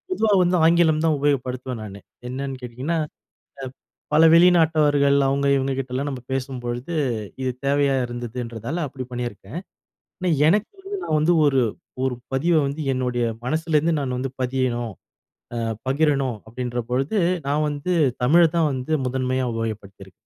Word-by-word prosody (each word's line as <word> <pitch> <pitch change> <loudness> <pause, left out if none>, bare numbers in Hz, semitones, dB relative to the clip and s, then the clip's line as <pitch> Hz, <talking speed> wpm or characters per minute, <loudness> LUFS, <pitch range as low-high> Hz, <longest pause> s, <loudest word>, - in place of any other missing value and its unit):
பொதுவா 220 -10 +2
வந்து 180 +1 +2
ஆங்கிலம் 165 -2 +4
தான் 160 -2 +3
உபயோகப்படுத்துவேன் 130 -3 -1
நானு, 100 -1 -8 0.3
என்னன்னு 135 0 -4
கேட்டீங்கன்னா, 130 +8 -3 0.6
அ - - -6 0.5
பல 160 - +6
வெளிநாட்டவர்கள் 155 -5 +4
அவங்க 140 +1 +1
இவங்க 135 0 -1
கிட்டலாம் 130 +2 -3
நம்ம 130 -2 -6
பேசும்பொழுது, 125 +2 -4 0.5
இது 130 - 0 0.2
தேவையா 140 -1 +2
இருந்ததுன்றதால 120 +2 -5
அப்படி 130 -1 -7
பண்ணியிருக்கேன், 120 - -5 0.6
ஆனா 185 -1 0 0.2
எனக்கு 210 +5 +2
வந்து 400 +1 -5
நான் 155 - +1
வந்து 170 +3 +3
ஒரு 135 -3 +3 0.4
ஒரு 130 -1 0 0.2
பதிவ 160 +6 +2
வந்து 140 +3 -4
என்னுடைய 125 -2 -1 0.2
மனசுலேருந்து 160 +3 +1
நான் 130 -2 -2
வந்து 130 +1 -3
பதியணும், 125 -3 -1 0.6
ஆ - - -2 0.3
பகிரணும் 135 -4 +1
அப்படின்ற 120 +1 -4
பொழுது 135 - 0 0.3
நான் 150 +2 +1
வந்து 145 +5 -2 0.3
தமிழ 165 +7 +5 0.2
தான் 160 -2 +3
வந்து 130 +3 -4
முதன்மையா 130 0 -1
உபயோகப்படுத்தியிருக்கேன். 100 -4 -6
135 Hz, 135 wpm, -23 LUFS, 125-155 Hz, 0.6 s, பல